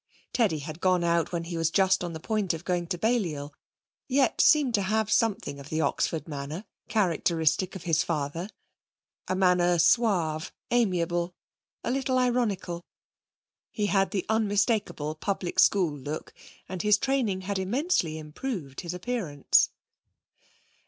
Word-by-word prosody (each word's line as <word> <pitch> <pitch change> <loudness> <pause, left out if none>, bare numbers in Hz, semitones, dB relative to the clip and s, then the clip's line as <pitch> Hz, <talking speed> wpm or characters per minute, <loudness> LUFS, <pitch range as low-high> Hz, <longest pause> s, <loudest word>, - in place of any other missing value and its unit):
Teddy 215 -10 +2
had 155 +2 -7
gone 185 -2 +3
out 170 -1 +1
when 170 -1 -2
he 170 +1 -6
was 165 -1 +1
just 190 +1 +3
on 175 - -3
the 160 - -6
point 205 -1 -1
of 165 - -10
going 175 -2 -1
to 175 - -2
Balliol, 170 -10 -1 0.5
yet 270 0 +2
seemed 290 -5 +5
to 205 - +3
have 215 +2 0
something 205 -12 +1
of 140 +1 -10
the 155 - -1
Oxford 160 +2 -1
manner, 150 +6 -5 0.2
characteristic 175 -2 +1
of 190 - -7
his 165 -2 +2
father 165 +3 -2 0.8
a 185 - 0
manner 180 -2 +3
suave, 170 -3 +2 0.2
amiable, 175 -6 +1 0.5
a - - -1
little 265 0 0
ironical. 230 -9 0 0.9
He 210 - -1
had 195 -2 +2
the 190 -1 -2
unmistakable 205 -7 +1
public 180 +2 -3
school 180 -7 +4
look 145 +2 -6 0.3
and 185 -1 -4
his 210 -1 +4
training 235 -7 0
had 195 +1 -2
immensely 195 - 0
improved 155 - -5
his 175 -1 -5
appearance. 180 - +1
180 Hz, 145 wpm, -27 LUFS, 165-215 Hz, 0.9 s, seemed